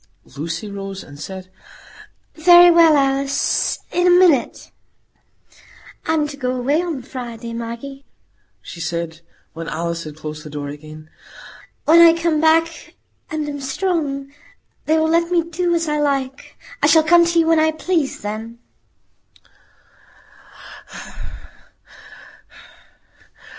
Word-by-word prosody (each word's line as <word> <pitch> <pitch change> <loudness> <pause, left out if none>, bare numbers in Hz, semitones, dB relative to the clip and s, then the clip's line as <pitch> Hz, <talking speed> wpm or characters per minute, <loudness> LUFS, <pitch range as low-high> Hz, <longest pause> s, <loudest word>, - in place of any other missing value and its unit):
Lucy 165 +7 -5
rose 195 -1 -7
and 145 -1 -14
said, 185 +4 -8 0.8
"Very 350 +2 +7
well, 330 -3 +6
Alice,—in 275 +5 0
a - - +6
minute." 355 -6 +3 1.4
"I'm 315 -2 +1
to 285 - -9
go 255 -2 -2
away 275 +6 0
on 325 -8 -4
Friday, 235 -3 -8
Maggie," 235 +4 -7 0.6
she 170 - -9
added, 165 0 -4 0.3
when 165 0 -7
Alice 170 +1 -3
had 150 -1 -9
closed 155 -1 -8
the 155 - -10
door 145 -1 -6
again. 155 +1 -11 0.7
"When 325 +2 +6
I 335 0 +6
come 330 -2 0
back, 325 +1 +1 0.3
and 310 -2 -3
am 285 -1 -6
strong, 275 -2 -3 0.5
they 315 +1 +3
will 315 0 +2
let 335 +1 +1
me 345 -2 +2
do 340 +1 -1
as 335 -1 -1
I 300 0 -1
like. 275 -2 -2 0.2
I - - +4
shall 320 -1 +5
come 340 +2 +5
to 340 0 0
you 330 - +4
when 325 0 +3
I 315 0 +3
please 315 -2 -2
then." 220 +3 -6
275 Hz, 125 wpm, -19 LUFS, 195-330 Hz, 1.4 s, Very